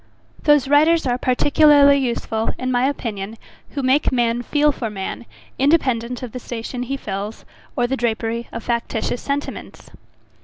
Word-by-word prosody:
Those 295 -3 +4
writers 310 +3 +4
are 250 -1 0
particularly 285 +2 +5
useful, 235 -4 -1
in 255 0 -2
my 250 +1 +2
opinion, 220 -5 -5 0.4
who 280 - -2
make 260 +3 +2
man 240 -1 +1
feel 295 +4 +2
for 240 -5 -4
man, 205 +3 -6 0.3
independent 255 -5 +1
of 245 - -6
the 250 - -6
station 240 +1 -6
he 270 +3 -3
fills, 205 -2 -6 0.3
or 245 -4 +1
the 260 +2 -1
drapery 230 0 -2
of 230 - -6
factitious 235 0 -2
sentiments. 285 +1 -5
250 Hz, 150 wpm, -20 LUFS, 230-280 Hz, 0.4 s, particularly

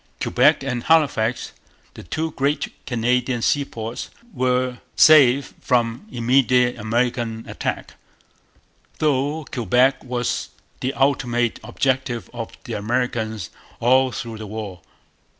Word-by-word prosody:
Quebec - - +3
and 125 -3 -3
Halifax, 135 -8 +2 0.4
the - - -10
two 160 - -3
great 140 +1 -1 0.2
Canadian 125 0 0
seaports, 115 -5 -2 0.2
were 125 0 0 0.2
safe 140 -3 +6
from 120 - 0
immediate 125 0 +3
American 115 0 -1
attack; - - -4 1.0
though 145 +1 0
Quebec 125 +2 +2
was 125 -1 -2 0.3
the 130 - -1
ultimate 120 -4 +1
objective 130 0 -1
of 115 -2 -7
the 120 - -6
Americans 110 -3 -2 0.3
all 130 +2 +4
through 115 -1 -6
the 110 - -7
war. 100 -4 -6
125 Hz, 105 wpm, -22 LUFS, 115-130 Hz, 1.0 s, safe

